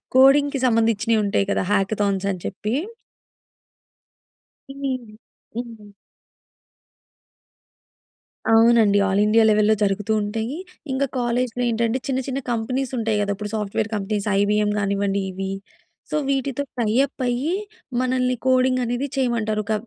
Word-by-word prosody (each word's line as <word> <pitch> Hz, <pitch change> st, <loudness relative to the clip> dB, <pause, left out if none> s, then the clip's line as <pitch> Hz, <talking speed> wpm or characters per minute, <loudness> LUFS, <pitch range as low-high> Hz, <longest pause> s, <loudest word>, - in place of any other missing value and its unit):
కోడింగ్‌కి 275 Hz, +1 st, +5 dB
సంబందిచ్చినియి 225 Hz, -1 st, +2 dB
ఉంటాయి 200 Hz, -1 st, +1 dB
కదా! -, -, +1 dB
హ్యాకథాన్స్ 200 Hz, -1 st, 0 dB
అని 180 Hz, -2 st, -6 dB
చెప్పి. 210 Hz, +4 st, -3 dB, 2.0 s
హ్మ్. 265 Hz, -4 st, -4 dB, 0.4 s
హ్మ్. 225 Hz, -4 st, -7 dB, 2.6 s
అవునండి. 225 Hz, -2 st, +5 dB
ఆల్ 195 Hz, +1 st, +1 dB
ఇండియా 220 Hz, +1 st, +4 dB
లెవెల్‌లో 215 Hz, 0 st, +4 dB
జరుగుతూ 205 Hz, +2 st, 0 dB
ఉంటాయి. 225 Hz, +7 st, -3 dB, 0.3 s
ఇంకా 275 Hz, +1 st, 0 dB
కాలేజ్‌లో 245 Hz, 0 st, -1 dB
ఏంటంటే 230 Hz, +2 st, 0 dB
చిన్న 260 Hz, -1 st, 0 dB
చిన్న 270 Hz, 0 st, -2 dB
కంపెనీస్ 250 Hz, +3 st, -2 dB
ఉంటాయి 225 Hz, -2 st, 0 dB
కదా! 200 Hz, 0 st, 0 dB
ఇప్పుడు 210 Hz, +1 st, -6 dB
సాఫ్ట్‌వేర్ 210 Hz, +1 st, -2 dB
కంపెనీస్, 205 Hz, +1 st, -2 dB
'ఐబీఎం' 210 Hz, +1 st, +2 dB
కానివ్వండి. 200 Hz, 0 st, 0 dB
ఇవి. 190 Hz, +1 st, -4 dB, 0.6 s
సో -, -, -1 dB
వీటితో 275 Hz, 0 st, -1 dB, 0.2 s
టై 215 Hz, -2 st, +1 dB
అప్ 265 Hz, -, -12 dB
అయ్యి 255 Hz, +8 st, 0 dB, 0.5 s
మనల్ని 255 Hz, 0 st, +1 dB
కోడింగ్ 255 Hz, 0 st, +3 dB
అనేది 245 Hz, +4 st, -2 dB
చేయమంటారు. 225 Hz, -5 st, 0 dB
ఒక 220 Hz, -, -1 dB
225 Hz, 120 wpm, -22 LUFS, 210-255 Hz, 2.6 s, కోడింగ్‌కి